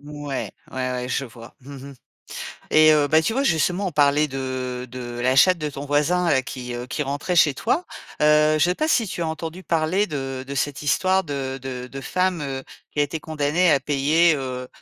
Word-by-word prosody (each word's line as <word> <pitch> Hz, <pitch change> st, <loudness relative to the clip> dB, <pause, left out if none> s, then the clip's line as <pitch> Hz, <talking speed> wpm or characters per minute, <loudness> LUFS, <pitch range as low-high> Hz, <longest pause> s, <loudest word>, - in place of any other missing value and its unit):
Mouais. 145 Hz, -1 st, -5 dB, 0.2 s
Ouais, 130 Hz, -1 st, -2 dB
ouais, 125 Hz, 0 st, -4 dB
je 135 Hz, -, -1 dB
vois. 115 Hz, 0 st, -13 dB
Mmh 140 Hz, +2 st, -11 dB, 0.2 s
mh, -, -, -12 dB, 0.8 s
et 155 Hz, 0 st, +7 dB
heu, 150 Hz, -1 st, +3 dB
bah 155 Hz, +2 st, +4 dB
tu 220 Hz, -, 0 dB
vois, 270 Hz, +4 st, 0 dB
justement, 180 Hz, -, +1 dB
on 175 Hz, -, -8 dB
parlait 145 Hz, +1 st, +3 dB
de 130 Hz, -2 st, -4 dB
de 120 Hz, -1 st, -7 dB
la 130 Hz, +1 st, +2 dB
chatte 185 Hz, +6 st, +6 dB
de 150 Hz, -2 st, -3 dB
ton 140 Hz, +1 st, -7 dB
voisin, 165 Hz, +5 st, +1 dB
heu, 130 Hz, -, +3 dB
qui, 125 Hz, -1 st, -6 dB
heu, 120 Hz, +1 st, -5 dB
qui 150 Hz, -, -2 dB
rentrait 145 Hz, +6 st, -2 dB
chez 150 Hz, -4 st, +5 dB
toi. 290 Hz, -, 0 dB, 0.4 s
Heu, 150 Hz, 0 st, +4 dB
je 175 Hz, +4 st, +3 dB
pas 310 Hz, +12 st, -1 dB
si 230 Hz, -8 st, +2 dB
tu 175 Hz, -, -4 dB
as 165 Hz, -, -1 dB
entendu 160 Hz, +3 st, -5 dB
parler 170 Hz, +5 st, +1 dB
de 135 Hz, -3 st, -4 dB
de 140 Hz, -, -5 dB
cette 145 Hz, +1 st, -2 dB
histoire 185 Hz, +6 st, +2 dB
de 135 Hz, -3 st, -4 dB
de 125 Hz, -1 st, -5 dB
de 135 Hz, +2 st, -8 dB
femme, 180 Hz, +3 st, -1 dB
heu, 135 Hz, -1 st, -4 dB, 0.3 s
qui -, -, -10 dB
a -, -, +5 dB
été 145 Hz, +3 st, -5 dB
condamnée 155 Hz, +3 st, +1 dB
à 140 Hz, -, +4 dB
payer, 150 Hz, +4 st, +3 dB
heu, 130 Hz, -2 st, -5 dB
145 Hz, 215 wpm, -23 LUFS, 130-165 Hz, 0.8 s, et